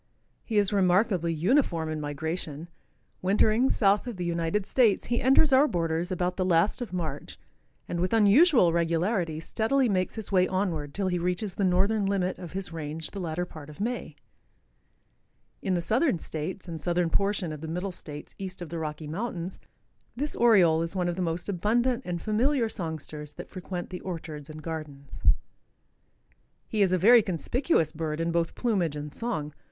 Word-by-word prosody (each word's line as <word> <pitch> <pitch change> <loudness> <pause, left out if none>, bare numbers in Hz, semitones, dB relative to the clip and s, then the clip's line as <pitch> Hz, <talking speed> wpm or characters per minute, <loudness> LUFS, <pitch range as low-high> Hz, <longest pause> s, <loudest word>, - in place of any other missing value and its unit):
He 220 - -2
is 205 0 +3
remarkably 185 -2 +2
uniform 170 - +1
in 155 -1 -3
migration. 155 +2 -4 0.5
Wintering 215 +6 +3
south 205 +2 +2
of 235 -5 -5
the 180 - -3
United 170 +3 -1
States, 230 -5 +3
he 240 0 0
enters 270 +3 +5
our 275 +3 +6
borders 165 - -1
about 180 0 -1
the 185 - +1
last 185 +6 +2
of 235 -7 -4
March 160 -6 -4 0.5
and 170 - -3
with 180 +1 0
unusual 225 - +5
regularity 170 0 0
steadily 240 +10 +1
makes 185 -4 0
his 220 -3 -5
way 185 -1 +4
onward 170 -7 -2
till 195 -1 0
he 180 -1 0
reaches 180 +3 -1
the 200 - -2
northern 195 +3 +2
limit 190 -2 0
of 175 -3 -8
his 190 -3 -2
range 155 0 -4
the 200 - -6
latter 175 0 -2
part 155 -4 -11
of 150 - -12
May. 225 -7 -3 1.5
In 185 - 0
the 175 - 0
southern 230 - +2
states 165 +4 -5
arid 165 -3 -6
southern 175 0 +1
portion 195 -3 0
of 150 - -8
the 160 - -5
middle 180 +4 -3
states 150 -4 -9
east 190 -1 -6
of 165 - -9
the 165 +1 -4
Rocky 155 0 -5
mountains 180 +1 -4 0.6
this 290 +4 -3
Oriole 185 -9 +5
is 165 +3 -3
one 180 -1 0
of 175 - -2
the 185 - -3
most 170 0 -2
abundant 230 +6 +1
and 175 -1 -3
familiar 230 - +1
songsters 155 -5 -5
that - - -9
frequent 185 -1 -6
the 180 - -6
orchards 160 -4 -6
and 155 0 -9
gardens. 150 -4 -7 1.5
He 215 - -1
is 190 -2 +4
a 185 - +3
very 230 +6 +7
conspicuous 190 - 0
bird 155 -1 -3
in 165 0 0
both 170 -1 0
plumage 190 - 0
and 150 0 -6
song. 155 -11 -3
180 Hz, 180 wpm, -27 LUFS, 165-205 Hz, 1.5 s, very